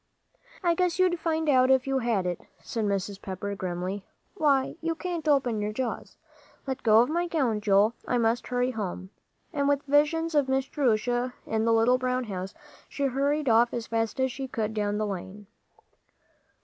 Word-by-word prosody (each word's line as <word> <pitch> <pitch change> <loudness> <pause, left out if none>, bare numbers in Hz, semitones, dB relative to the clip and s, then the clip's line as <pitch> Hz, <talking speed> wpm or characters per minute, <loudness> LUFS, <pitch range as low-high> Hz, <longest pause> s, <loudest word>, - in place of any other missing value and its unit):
"I 345 -1 +3
guess 355 0 0
you'd 365 -2 +2
find 320 -1 -1
out 260 -3 +4
if 265 -1 +4
you 270 -1 0
had 230 -6 0
it," 175 -1 -2 0.2
said 225 -2 -2
Mrs. 200 0 -2
Pepper, 195 +1 -5
grimly. 185 +1 -4 0.3
"Why, 285 -8 +2
you 330 0 -1
can't 340 -2 -4
open 255 -7 +2
your 210 +1 -1
jaws. 240 +2 -4 0.5
Let 265 -2 -4
go 220 0 +6
of 245 - +2
my 345 +2 0
gown, 255 -11 0
Joel. 205 +2 +4
I 245 - +1
must 235 +1 +1
hurry 250 +1 0
home." 190 -4 -5 0.4
And 285 -2 +1
with 285 0 +1
visions 300 +3 +2
of 285 -3 +2
Miss 265 0 +1
Jerusha 245 -2 0
in 220 0 -1
the 230 - +3
little 235 +3 +4
brown 255 0 0
house, 195 -2 -6 0.3
she 280 - -4
hurried 280 +3 0
off 235 +1 +4
as 235 -1 -3
fast 225 +2 -2
as 260 0 +1
she 265 +1 -5
could 220 -4 -3
down 210 -1 -1
the 215 - 0
lane. 200 +1 -6
245 Hz, 185 wpm, -27 LUFS, 210-280 Hz, 0.5 s, go